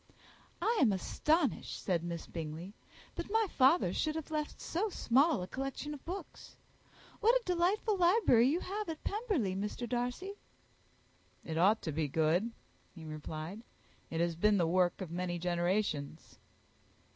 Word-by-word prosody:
"I 445 +2 +2
am 225 - +5
astonished," 300 - 0
said 175 -4 0
Miss 170 -1 -4
Bingley, 165 +4 -6 0.4
"that - - -5
my 445 +1 +3
father 265 - +4
should 310 +7 0
have 320 0 -5
left 305 -1 -3
so 395 +6 -1
small 275 - +3
a - - -6
collection 270 +6 -4
of 290 - -10
books. 370 +4 -7 0.6
What 465 +2 +4
a - - +2
delightful 370 +4 +1
library 345 - +5
you 325 +6 +1
have 410 0 -4
at 320 -1 -6
Pemberley, 400 - -1
Mr. 210 +5 -3
Darcy!" 245 - -2 1.1
"It 160 - -4
ought 195 +7 +4
to 160 - -2
be 155 0 -1
good," 160 - +2 0.5
he 165 -3 -10
replied: 155 +5 -6 0.5
"it 165 - -3
has 170 -1 +1
been 210 +4 +3
the 175 - +3
work 180 +2 +2
of 180 -4 -5
many 175 0 -2
generations." 175 -3 -1
225 Hz, 150 wpm, -33 LUFS, -, 1.1 s, am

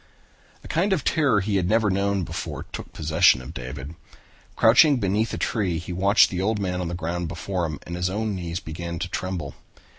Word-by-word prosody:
A - - -10
kind 190 +5 +1
of 160 -8 0
terror 145 -10 +2
he 100 +1 0
had 90 -1 0
never 110 -2 +3
known 100 0 0
before - - -5
took - - -7
possession 80 -2 +4
of 65 +5 -9
David. 65 +3 -7 0.6
Crouching 135 +6 +6
beneath 105 +1 0
a - - -3
tree 95 -7 -1
he 90 +2 -6
watched 100 +4 +4
the 95 +4 0
man 90 -3 -2
on 90 - -3
the 85 - -3
ground 85 0 -3
before 90 +2 -3
him 75 -2 -5
and 85 - -5
his 90 +1 -1
own 105 +2 -2
knees 85 -2 -4
began 85 +1 -6
to 90 - -3
tremble. 90 -5 -4
90 Hz, 200 wpm, -24 LUFS, 85-105 Hz, 0.6 s, Crouching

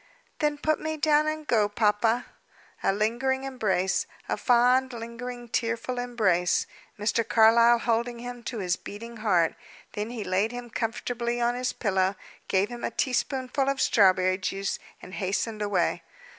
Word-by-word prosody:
"Then 295 -1 +1
put 310 +1 0
me 315 0 -3
down, 305 0 +3
and 310 0 -3
go, 215 -6 +2
papa." 220 +3 +1 0.6
A - - +2
lingering 240 +6 0
embrace 210 -8 0 0.2
a - - 0
fond, 250 +2 +3
lingering, 240 +1 -7
tearful 230 +2 -2
embrace 205 -8 +1 0.3
Mr. 215 +2 +1
Carlyle 230 +2 +5
holding 235 +1 -1
him 245 0 -7
to 240 - -4
his 180 -3 0
beating 230 +3 -9
heart, 185 -7 +2 0.4
then 210 +2 -3
he 235 -3 -5
laid 195 +5 0
him 245 -1 -7
comfortably 235 +1 -2
on 240 0 +2
his 250 +1 -1
pillow, 190 -2 0 0.3
gave 195 +2 +1
him 240 -1 -8
a - - 0
teaspoonful 265 +1 -1
of 275 -1 -1
strawberry 185 -5 +4
juice, 195 +1 -2 0.2
and 185 - -10
hastened 210 +3 -2
away. 200 -4 0
235 Hz, 150 wpm, -27 LUFS, 205-245 Hz, 0.6 s, Carlyle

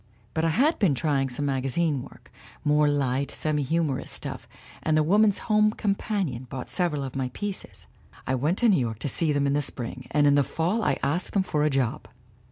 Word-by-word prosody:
"But 160 - 0
I 165 - +3
had 275 - +2
been 175 -10 +3
trying 135 -2 0
some 135 +4 -3
magazine 135 +2 0
work - - -14 0.3
more 150 0 +4
light, 140 -1 0
semi 155 -1 -1
humorous 145 -1 -1
stuff, - - -6 0.3
and 155 -1 +1
the 155 - +4
Woman's 205 +5 +4
Home 215 -1 +4
Companion 195 - -2
bought 130 -2 -6
several 165 -6 0
of 135 -1 -6
my 130 -2 -1
pieces. 145 - -5 0.4
I 130 - -1
went 150 +8 +1
to 240 - +4
New 190 - +4
York 115 -3 -2
to 145 - -3
see 155 +3 +1
them 145 -1 +1
in 140 - +1
the 145 - +2
spring 125 -2 -6
and 145 0 +3
in 145 - +5
the 145 0 +4
fall 175 +11 -1
I - - +1
asked 165 +6 -1
them 195 - +2
for 150 -5 0
a 150 - +3
job. 135 -5 -1
150 Hz, 210 wpm, -26 LUFS, 135-175 Hz, 0.4 s, in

